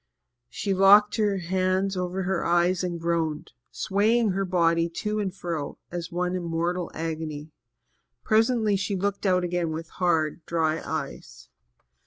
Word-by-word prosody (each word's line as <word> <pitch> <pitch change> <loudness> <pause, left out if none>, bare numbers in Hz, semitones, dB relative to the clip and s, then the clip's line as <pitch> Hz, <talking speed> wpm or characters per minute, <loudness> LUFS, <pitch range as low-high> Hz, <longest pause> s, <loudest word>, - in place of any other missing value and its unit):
She 195 - -2
locked 200 +3 +6
her 205 -3 +1
hands 185 +2 0
over 180 +1 -2
her 185 -1 -1
eyes 175 +2 +2
and 175 -2 -3
groaned, 165 -2 -1 0.2
swaying 215 +2 +1
her 195 +1 -1
body 170 -2 +2
to 210 +5 -3
and 200 -2 -1
fro 170 -6 -5
as 175 +1 -5
one 180 +1 -1
in 180 - -2
mortal 170 +1 -2
agony. 155 -1 -4 0.7
Presently 220 -1 +2
she 200 +1 -1
looked 200 +1 -1
out 180 -1 +3
again 175 -1 -1
with 160 +1 -5
hard, 165 -3 0
dry 160 -1 0
eyes. - - -6
180 Hz, 145 wpm, -26 LUFS, 165-195 Hz, 0.7 s, locked